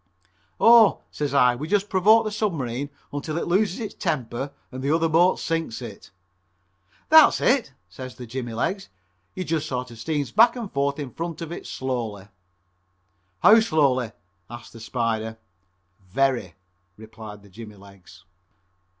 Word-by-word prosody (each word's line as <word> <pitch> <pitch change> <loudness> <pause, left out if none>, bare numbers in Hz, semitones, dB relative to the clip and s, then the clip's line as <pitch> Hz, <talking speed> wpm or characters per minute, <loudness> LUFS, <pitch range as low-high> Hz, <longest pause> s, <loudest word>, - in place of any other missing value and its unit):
"Oh," 230 -3 +6
says 145 -2 -3
I, 125 -3 +4
"we 145 +5 -6
just 205 +2 +1
provoke 210 +4 +4
the 215 - -2
submarine 145 - -2 0.2
until 150 +2 -4
it - - -2
loses 190 +1 +1
its 220 -3 -5
temper 135 - -3 0.2
and 130 0 -7
the 140 - -2
other 165 +2 +2
boat 170 +3 +3
sinks 165 -8 -2
it." 115 -7 -10 1.0
"That's 315 0 +7
it," 245 - +2 0.2
says 130 +5 -9
the 125 - -9
jimmy 120 -1 -6
legs, 190 - -2 0.5
"you 185 - -3
just 160 -2 -2
sort 125 -3 -4
of 115 - -12
steam 145 +2 -2
back 230 +3 +6
and 230 -5 -6
forth 140 0 -1
in 140 -5 -6
front 165 0 -5
of 165 - -8
it 170 - -7
slowly." 115 -7 -4 1.1
"How 220 +2 +8
slowly?" 140 - +1 0.4
asks 120 +1 -10
the 115 - -11
Spider. 110 -1 -2 0.7
"Very," 125 - 0 0.4
replied 110 -1 -11
the 100 - -17
jimmy 105 +2 -11
legs. 95 -2 -17
140 Hz, 150 wpm, -24 LUFS, 115-175 Hz, 1.1 s, How